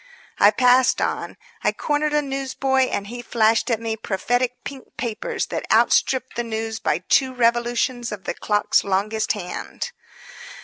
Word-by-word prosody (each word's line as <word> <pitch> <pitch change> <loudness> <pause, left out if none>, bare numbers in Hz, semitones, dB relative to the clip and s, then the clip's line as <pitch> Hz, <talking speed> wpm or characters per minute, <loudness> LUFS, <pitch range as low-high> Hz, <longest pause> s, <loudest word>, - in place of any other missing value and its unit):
'" - - -29
I 205 - +8
passed 250 +3 +4
on. - - -2 0.3
I - - +3
cornered 300 0 -1
a 295 - +2
newsboy 270 -1 0
and 200 - -2
he 240 +4 -7
flashed 230 0 +2
at 230 -3 +1
me 225 -1 -2
prophetic 245 +4 -1
pink 270 -2 -10
papers 250 - -3
that - - -4
outstripped 260 -1 +3
the 240 - -1
news 225 -1 -4
by 175 - -1
two 260 -1 +3
revolutions 240 0 +1
of 205 -3 -6
the - - -3
clock's 210 -1 +1
longest 210 +3 0
hand. 205 - -6
240 Hz, 160 wpm, -22 LUFS, 220-260 Hz, 0.3 s, I